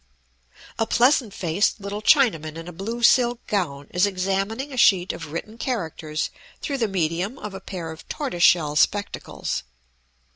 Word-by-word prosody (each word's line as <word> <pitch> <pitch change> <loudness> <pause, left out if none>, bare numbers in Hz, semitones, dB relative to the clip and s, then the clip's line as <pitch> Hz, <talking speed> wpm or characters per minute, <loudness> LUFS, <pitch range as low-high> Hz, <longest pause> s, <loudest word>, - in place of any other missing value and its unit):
A 225 - +1
pleasant 245 -2 +3
faced 185 +4 0
little 200 +1 -5
Chinaman 185 - +3
in 165 +1 -8
a - - -6
blue 225 +7 -5
silk 240 -1 +4
gown 145 -9 -2
is 180 +3 +3
examining 195 +8 -2
a - - -5
sheet 190 -6 +4
of 165 -3 -8
written 215 +8 -6
characters 160 - -3 0.3
through 280 -3 -3
the 225 - +2
medium 185 +4 -1
of 210 -6 -7
a 195 - -7
pair 175 -4 -6
of 160 +1 -12
tortoise 265 - -3
shell 155 -4 +5
spectacles. 205 +6 0
195 Hz, 155 wpm, -24 LUFS, 165-230 Hz, 0.3 s, shell